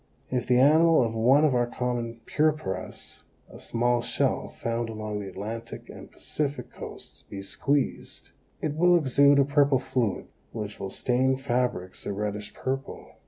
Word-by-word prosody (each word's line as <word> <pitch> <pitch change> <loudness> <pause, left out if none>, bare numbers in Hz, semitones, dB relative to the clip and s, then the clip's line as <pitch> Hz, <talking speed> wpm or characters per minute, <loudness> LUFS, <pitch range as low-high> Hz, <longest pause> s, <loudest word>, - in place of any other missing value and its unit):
If 125 -1 -1
the 125 - +4
animal 160 +2 +6
of 115 - -3
one 130 +7 +4
of 145 - +3
our 120 -1 +2
common 120 -2 -3
purpuras, 150 -12 -2 0.3
a - - -11
small 120 +1 +1
shell - - 0
found 115 0 -3
along 110 -1 -4
the 100 -1 -6
Atlantic 115 +4 -7
and - - -11
Pacific 145 -1 -4
coasts, - - -9
be 100 -1 -6
squeezed, 140 +7 -2 0.3
it 155 - 0
will 175 +3 +4
exude 140 -2 +5
a 140 - +5
purple 145 -1 +3
fluid 120 -6 -1 0.3
which 105 -2 -5
will 95 - -4
stain 130 +4 +1
fabrics 120 -8 -2
a - - -1
reddish 105 0 -4
purple. 135 +1 -4
125 Hz, 155 wpm, -27 LUFS, 110-140 Hz, 0.3 s, animal